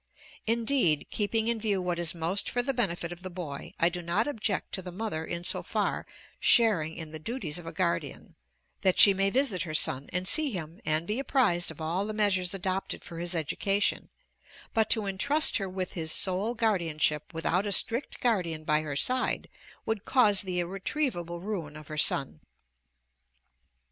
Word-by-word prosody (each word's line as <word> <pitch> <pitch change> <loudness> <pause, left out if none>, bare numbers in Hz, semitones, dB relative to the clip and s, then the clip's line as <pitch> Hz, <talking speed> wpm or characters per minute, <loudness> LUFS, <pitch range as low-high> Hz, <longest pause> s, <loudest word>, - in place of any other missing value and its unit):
Indeed, 225 - +2
keeping 220 +1 0
in 235 -1 +1
view 205 -3 +1
what 180 -1 -2
is 170 0 0
most 170 +4 0
for 245 - -1
the 270 +2 -1
benefit 175 -8 -1
of 175 0 -9
the 185 - -7
boy, 170 -6 -7
I 170 - +5
do 175 0 -6
not 175 +8 0
object 215 -8 -2
to 190 - -4
the 180 0 -8
mother 185 -4 -4
in 170 +1 -5
so - - +2
far - - -2 0.3
sharing 195 - +4
in 160 -2 -8
the 155 - -8
duties 175 - -4
of 170 - -11
a - - -5
guardian, 170 -4 -3 0.5
that 185 -1 +3
she 200 - +9
may 195 +1 +2
visit 250 -5 +2
her 155 -3 -3
son, 135 -3 +2
and 180 +1 -2
see 310 +6 +5
him, 170 - -7
and 155 +1 +1
be 210 +7 -2
apprised 235 -11 +2
of 160 - -7
all 170 +6 -2
the 215 - -5
measures 195 -3 +2
adopted 190 0 -3
for 165 - -9
his 175 +1 -1
education; 195 +6 0 0.6
but 220 -1 +2
to 220 -2 +4
intrust 280 +11 +3
her 195 -2 -4
with 185 0 -4
his 160 -3 -2
sole 195 +7 +1
guardianship 165 -9 0
without 175 +4 -1
a - - -2
strict 235 +7 +1
guardian 175 -10 0
by 150 0 +1
her 150 -2 -5
side 255 - 0 0.4
would 220 -2 -2
cause 215 -7 +4
the 185 -2 -3
irretrievable 175 - -3
ruin 175 -7 -5
of 155 0 -13
her 155 - -6
son. 135 - +1
185 Hz, 185 wpm, -28 LUFS, 165-215 Hz, 0.6 s, she